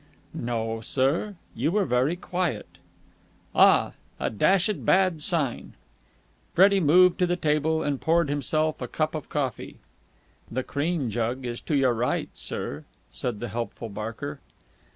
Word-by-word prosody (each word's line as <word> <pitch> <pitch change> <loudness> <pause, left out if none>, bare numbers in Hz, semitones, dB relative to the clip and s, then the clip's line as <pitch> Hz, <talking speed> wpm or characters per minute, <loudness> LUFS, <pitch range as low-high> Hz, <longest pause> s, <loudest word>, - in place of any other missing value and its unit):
"No, 115 -1 -3
sir. 140 - 0 0.2
You 130 +7 0
were 205 0 +2
very 130 +6 +1
quiet." 175 - -2 0.9
"Ah! - - +5 0.3
A - - -1
dashed 190 - +2
bad 185 -4 +3
sign!" 150 -6 0 0.8
Freddie 195 +2 +6
moved 180 +2 +5
to 180 - +3
the 175 - +1
table, 160 -1 +1
and 140 -2 -2
poured 165 0 +2
himself 155 +2 0
a 125 - -3
cup 155 +5 -1
of 155 - -6
coffee. 135 -5 -3 0.7
"The 130 +3 -2
cream 145 -3 -1
jug 120 +4 -2
is 120 -1 -4
to 150 - -2
your 130 -3 +3
right, 120 +2 -1
sir," - - -3 0.3
said 120 -4 -4
the 120 - -4
helpful 115 +1 -5
Barker. 115 +8 -6
145 Hz, 140 wpm, -26 LUFS, 120-170 Hz, 0.9 s, Freddie